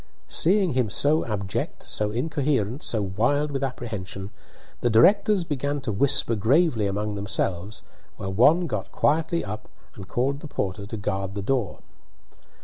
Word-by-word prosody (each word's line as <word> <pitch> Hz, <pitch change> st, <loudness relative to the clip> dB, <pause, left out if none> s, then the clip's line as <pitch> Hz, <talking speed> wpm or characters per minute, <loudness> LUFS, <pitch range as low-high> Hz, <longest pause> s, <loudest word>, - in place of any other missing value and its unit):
Seeing 190 Hz, +1 st, +3 dB
him 125 Hz, -4 st, 0 dB
so 150 Hz, +9 st, +3 dB
abject, 100 Hz, -3 st, -3 dB
so 105 Hz, -1 st, 0 dB
incoherent, 130 Hz, -1 st, -1 dB
so 110 Hz, -3 st, +1 dB
wild 120 Hz, +10 st, 0 dB
with 135 Hz, -1 st, -2 dB
apprehension, 105 Hz, -6 st, -5 dB, 0.5 s
the 120 Hz, -, +1 dB
directors 195 Hz, -, +4 dB
began 145 Hz, -2 st, -2 dB
to 125 Hz, -, -2 dB
whisper 125 Hz, +2 st, +3 dB
gravely 115 Hz, -, +2 dB
among 105 Hz, +2 st, -2 dB
themselves, 100 Hz, -1 st, -2 dB, 0.3 s
while 95 Hz, -1 st, -4 dB
one 150 Hz, -, +5 dB
got -, -, -4 dB
quietly 160 Hz, +1 st, +1 dB
up 105 Hz, +1 st, -7 dB, 0.2 s
and 100 Hz, -2 st, -10 dB
called 135 Hz, +7 st, -1 dB
the 155 Hz, -, -8 dB
porter 100 Hz, -5 st, -4 dB
to 110 Hz, -, -5 dB
guard 100 Hz, -1 st, -3 dB
the 100 Hz, -, -3 dB
door. 120 Hz, -3 st, -1 dB
115 Hz, 145 wpm, -25 LUFS, 100-145 Hz, 0.5 s, one